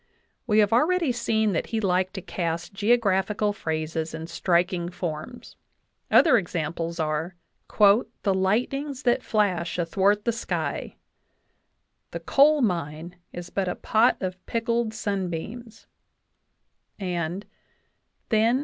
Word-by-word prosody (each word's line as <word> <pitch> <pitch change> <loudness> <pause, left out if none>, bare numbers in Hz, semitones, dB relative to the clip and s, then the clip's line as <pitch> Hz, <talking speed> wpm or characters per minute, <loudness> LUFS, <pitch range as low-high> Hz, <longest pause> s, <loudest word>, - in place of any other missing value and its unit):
We 210 -2 +2
have 210 0 +4
already 320 +4 +3
seen 220 -3 +1
that 170 - -1
he 225 - -2
liked 185 -1 0
to 190 - -5
cast 170 +1 -3
geographical 205 -1 +1
phrases 160 -2 -3
in 160 0 -6
striking 175 +1 0
forms; 175 +6 -6 0.5
other 300 -8 +6
examples 170 -1 -4
are: 160 +3 -2 0.4
"The 205 -1 +3
lightnings 250 +9 -1
that 245 0 +2
flash 190 -8 0
athwart 195 +4 +1
the 235 - +2
sky," 225 - -3 1.1
"the - - -5
coal 295 +2 +4
mine 170 -3 -2
is 175 0 -8
but 195 -2 -1
a 180 - -2
pot 225 +3 +2
of 185 -1 -4
pickled 230 0 0
sunbeams," 205 +3 -4 1.1
and 180 0 -3 0.8
"then 225 +3 +3
195 Hz, 115 wpm, -25 LUFS, 170-225 Hz, 1.1 s, other